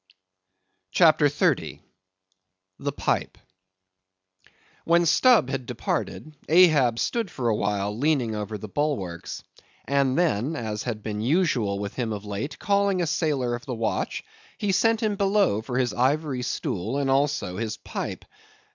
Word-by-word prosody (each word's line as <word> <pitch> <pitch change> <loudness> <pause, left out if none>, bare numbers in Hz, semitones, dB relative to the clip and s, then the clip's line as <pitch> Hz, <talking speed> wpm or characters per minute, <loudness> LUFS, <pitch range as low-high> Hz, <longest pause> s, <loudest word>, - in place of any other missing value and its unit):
CHAPTER 155 - +5
30. 145 - 0 1.0
The - - -2
Pipe. - - -1 1.5
When 170 +1 +3
Stubb 220 - +4
had 130 -3 -3
departed, 155 0 -3
Ahab 155 -9 +5
stood 230 - -1
for 120 -6 -2
a 110 - +2
while 105 0 -1
leaning 130 -3 +1
over 105 0 -4
the 105 - -8
bulwarks; 100 - -3 0.4
and 140 -1 +1
then, 155 -4 +1
as 110 -5 -3
had 110 -4 -4
been 105 -1 -3
usual 125 - +1
with 100 0 -4
him 115 -4 -2
of 105 0 -6
late, 105 +8 -4
calling 200 -1 +1
a 175 - +1
sailor 145 -6 0
of 120 0 -6
the 125 - -3
watch, 115 -1 -2 0.3
he 205 -2 0
sent 225 +4 +2
him 210 -2 0
below 195 - +2
for 125 +2 -4
his 125 -2 +1
ivory 135 +1 0
stool, 110 0 -2
and 140 -1 0
also 135 -9 0
his 110 -1 -3
pipe. - - -6
130 Hz, 145 wpm, -25 LUFS, 110-160 Hz, 1.5 s, CHAPTER